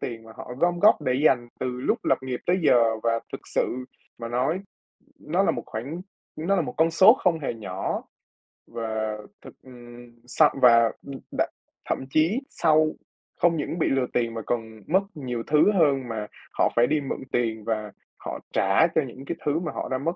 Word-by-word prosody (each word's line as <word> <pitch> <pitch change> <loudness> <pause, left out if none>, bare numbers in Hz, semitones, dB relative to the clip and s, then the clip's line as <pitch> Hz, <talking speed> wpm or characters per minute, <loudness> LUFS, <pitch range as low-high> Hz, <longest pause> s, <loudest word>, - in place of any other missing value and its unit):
tiền 115 -2 -5
mà 110 - -13
họ - - -8
gom 175 +1 +2
góp 205 -4 +5
để 130 -3 +1
dành 120 -5 +3
từ - - -1
lúc - - -1
lập - - +3
nghiệp 130 -2 -4
tới 180 +2 +3
giờ 115 -6 +4
và 115 0 +1
thực - - -5
sự 125 +1 -1 0.3
mà 115 0 -5
nói 130 +10 0 0.6
nó - - 0
là - - +3
một - - -4
khoản 140 +11 -6 0.3
nó 180 +6 0
là 180 - +2
một 155 - -5
con 165 +1 +3
số 195 +7 +8
không 175 -9 +1
hề 135 -5 -3
nhỏ. 95 -4 -4 0.6
Và 110 -2 -3 0.2
thực, - - -12
ừm 120 -1 -13 0.2
sau 150 +5 +4
và, 115 -2 +6 0.2
ừm 140 - -6 0.2
đ - - +2 0.4
thậm 130 - -2
chí 165 - +2
sau 155 -1 +3 0.5
không 170 -1 +4
những 155 +3 -3
bị - - +2
lừa 135 -2 +1
tiền 115 -1 0
mà 115 - -4
còn 110 -2 -3
mất 190 +4 +3
nhiều 125 -5 -4
thứ 150 +7 +5
hơn 145 -9 +2
mà 105 -2 -4 0.3
họ - - +2
phải 120 +1 +4
đi 150 0 +1
mượn 135 - -4
tiền 110 -3 -1
và 110 -2 -2 0.3
họ - - -6
trả 100 - +4
cho 160 - +1
những 130 +3 -11
cái - - -3
thứ 150 +2 +1
mà 165 -3 -4
họ - - -5
đã 130 - +1
mất. 165 +6 -2
130 Hz, 200 wpm, -25 LUFS, 115-160 Hz, 0.6 s, số